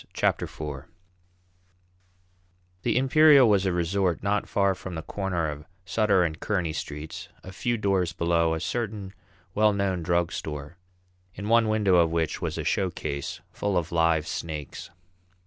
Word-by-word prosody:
Chapter - - +1
Four 70 -3 -7 1.9
The - - +1
Imperial 140 0 +6
was 100 -3 +3
a - - +2
resort 90 +1 0
not 100 +1 0
far 100 -1 +2
from 95 -1 -8
the 80 - -5
corner 90 -4 -2
of 75 0 -6 0.2
Sutter 100 -4 +3
and 80 -2 -2
Kearney 90 -7 -1
streets, 75 0 -6
a 95 - -9
few 120 +5 -1
doors 95 -4 +1
below 85 -2 +1
a - - -3
certain 105 -1 -3 0.4
well 105 0 +4
known 100 -3 0
drug 85 0 +1
store, 75 +2 -6 0.6
in 100 +2 -5
one 115 -1 +4
window 105 -4 +3
of 85 -1 +4
which 80 -1 -1
was - - -3
a - - -2
showcase 75 -7 -2
full 100 -2 -1
of 85 -1 -2
live 80 -2 +2
snakes. 75 -5 -5
90 Hz, 150 wpm, -26 LUFS, 80-100 Hz, 1.9 s, Imperial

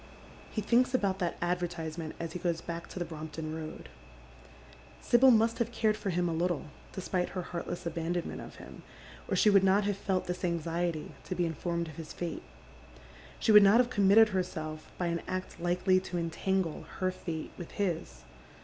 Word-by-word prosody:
He 215 - -2
thinks 250 +4 +3
about 195 -5 +1
that 175 -3 -1
advertisement 170 -2 -3
as 165 -1 -4
he 180 - -4
goes 170 -1 0
back 170 0 -6
to - - -10
the 175 - -1
P.rompton 155 -1 -6
Koad. 160 0 -6 1.1
Sibyl 250 +2 +5
must 225 -1 +4
liave 235 0 0
cared 220 -2 +2
for 205 - -3
him 175 0 +1
a 165 - -1
little, 170 -3 -1 0.2
despite 185 -1 -2
her 185 -2 -4
heartless 175 0 -5
abandonment 170 +1 -2
of - - -10
him, - - -11 0.5
or - - 0
she 210 - +5
would 195 -1 +6
not 195 +2 +4
have 205 0 0
felt 190 -1 -1
this 180 +1 -4
anxiety 170 -1 -1
to 185 - -3
be 175 - +1
inf 165 -2 -5
ornuid 170 -1 -1
of 155 - -12
his 160 -2 -7
fate. 170 -2 -4 1.0
She - - +2
would 210 -1 +10
not 200 +3 +7
have 245 0 +3
committed 210 +1 +6
herself 155 -5 -3
by 180 - -1
an 170 -1 -1
act 185 0 -4
likely 180 +2 +3
to 185 -1 -5
entangle 170 +1 -1
her 185 0 +1
fate 165 -3 -5
with 175 - -8
his. 160 - -2
175 Hz, 185 wpm, -31 LUFS, 165-195 Hz, 1.1 s, would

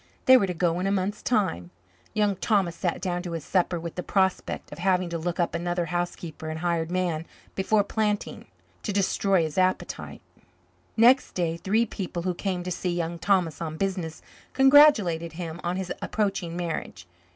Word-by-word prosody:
They 260 - +8
were 205 -6 +4
to 180 - -2
go 170 0 +1
in 185 - -1
a - - +1
month's 200 +1 -1
time. 190 - 0 0.5
Young 210 -2 +2
Thomas 195 -6 +1
sat 175 -1 -2
down 180 -2 -1
to 175 -2 -6
his 165 -3 -5
supper 180 -2 +1
with 170 0 -6
the 180 - -4
prospect 190 0 -1
of - - -9
having 180 -1 +1
to 170 - -3
look 175 +2 -3
up 170 - +1
another 175 +1 -1
housekeeper 175 -2 -4
and 155 - -4
hired 170 -2 0
man 175 -3 -1 0.3
before 205 +2 +2
planting 210 0 -2 0.3
to 210 - -3
destroy 195 -2 +2
his 155 +3 -2
appetite. 185 0 -1 0.7
Next 250 +4 +5
day, 170 -2 -1
three 210 +7 +1
people 180 -5 -5
who 180 0 0
came 180 0 -3
to 180 - -4
see 180 - -2
Young 170 -1 -2
Thomas 175 -4 +1
on 160 -1 -4
business 180 -4 -3 0.3
congratulated 265 - +5
him 165 0 -6
on 175 +1 -1
his 190 -1 -3
approaching 195 -5 -2
marriage. 165 - -4
180 Hz, 180 wpm, -26 LUFS, 170-195 Hz, 0.7 s, They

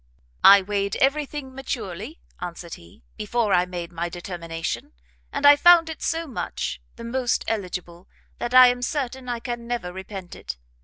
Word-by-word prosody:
"I 200 0 +9
weighed 200 0 -1
every 280 +2 +2
thing 270 -3 -7
maturely," 255 - -6 0.2
answered 170 -1 -7
he, 85 -7 -14
"before 215 0 0
I 180 0 +3
made 175 -1 -6
my 170 0 -3
determination, 170 - -5 0.4
and - - -2
I 290 0 +10
found 330 +1 +6
it 315 - -9
so 330 +1 -1
much, 270 - -4
the 235 - -10
most 245 +1 -1
eligible, 180 -4 -4 0.3
that 240 +1 -2
I 255 0 +11
am 245 0 -2
certain 260 -1 -3
I 240 -1 -2
can 240 -1 -5
never 235 -7 -3
repent 190 -1 -8
it. 60 - -7
225 Hz, 165 wpm, -24 LUFS, 180-260 Hz, 0.4 s, I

